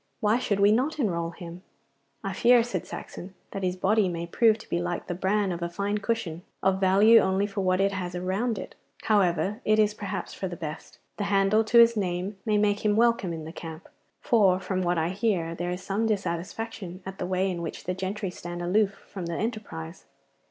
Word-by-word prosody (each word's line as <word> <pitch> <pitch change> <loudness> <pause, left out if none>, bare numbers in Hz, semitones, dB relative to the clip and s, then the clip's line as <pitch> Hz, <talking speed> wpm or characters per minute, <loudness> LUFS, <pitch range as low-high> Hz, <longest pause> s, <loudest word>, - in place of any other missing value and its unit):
Why 215 +3 +2
should 205 -5 -1
we 200 +1 +6
not 260 +9 +1
enrol 170 - 0
him?' 170 +1 -9 0.6
'I - - -3
fear,' 240 0 +5
said 195 -7 -4
Saxon, 185 +2 -8 0.2
'that 195 - -4
his 180 -1 0
body 200 +1 +2
may 170 -1 -3
prove 220 +5 +3
to 220 - -14
be 170 - -1
like 175 0 -3
the - - -3
bran 190 +2 0
of 170 0 -4
a 170 - -2
fine 200 +4 -2
cushion, 200 -7 -2 0.2
of 190 0 +2
value 200 +4 +6
only 190 +1 +1
for 200 -1 -3
what 185 0 +2
it 195 0 +3
has 180 -2 -4
around 195 +6 -1
it. - - -7 0.3
However, 200 +1 +2
it 215 0 +3
is 210 -1 +3
perhaps 205 -2 -5
for 190 - -4
the 175 - -6
best. 160 -2 -7 0.2
The 205 - -2
handle 200 +2 +3
to 235 - +3
his 235 0 +7
name 190 0 -2
may 210 -1 +3
make 205 0 +1
him 210 -1 +3
welcome 230 -4 +2
in 160 -2 -5
the 160 - -7
camp, 165 0 -8 0.3
for 200 -7 +3
from 185 0 -2
what 175 -1 +1
I 160 +1 +1
hear 185 -4 0
there 175 +1 -3
is 180 +1 -4
some 210 +3 0
dissatisfaction 190 0 -4
at 190 0 -7
the 180 - -2
way 185 +1 +1
in 175 -1 -4
which 165 - -6
the 180 - -2
gentry 190 +1 -3
stand 175 -1 -6
aloof 195 +2 +2
from 185 -4 -6
the 170 - -3
enterprise. 215 - -5
190 Hz, 215 wpm, -27 LUFS, 175-210 Hz, 0.6 s, his